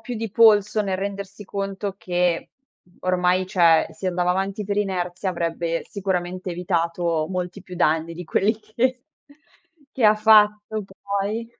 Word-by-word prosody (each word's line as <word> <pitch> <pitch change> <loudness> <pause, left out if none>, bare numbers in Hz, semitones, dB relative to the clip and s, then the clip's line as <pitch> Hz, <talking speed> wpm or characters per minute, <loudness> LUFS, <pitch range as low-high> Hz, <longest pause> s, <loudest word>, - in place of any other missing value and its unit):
più 245 - -6
di 225 -1 -4
polso 210 -1 +5
nel 190 -2 -1
rendersi 200 +1 -6
conto 195 0 -4
che 175 -2 -1 0.5
ormai, 185 0 +1
cioè, 170 -4 +4
si 190 - -6
andava 180 0 +1
avanti 195 +3 -2
per 200 +1 -2
inerzia, 185 -2 -2
avrebbe 170 -1 -2
sicuramente 185 -2 -3
evitato 170 -2 -1
molti 180 +1 -4
più 185 -2 -10
danni 165 0 +1
di 180 +1 -7
quelli 210 +6 +1
che 250 +4 -1 1.0
che 255 - 0
ha 215 0 +7
fatto 210 -1 +4 0.2
poi. 200 +3 -2
190 Hz, 140 wpm, -23 LUFS, 175-210 Hz, 1.0 s, ha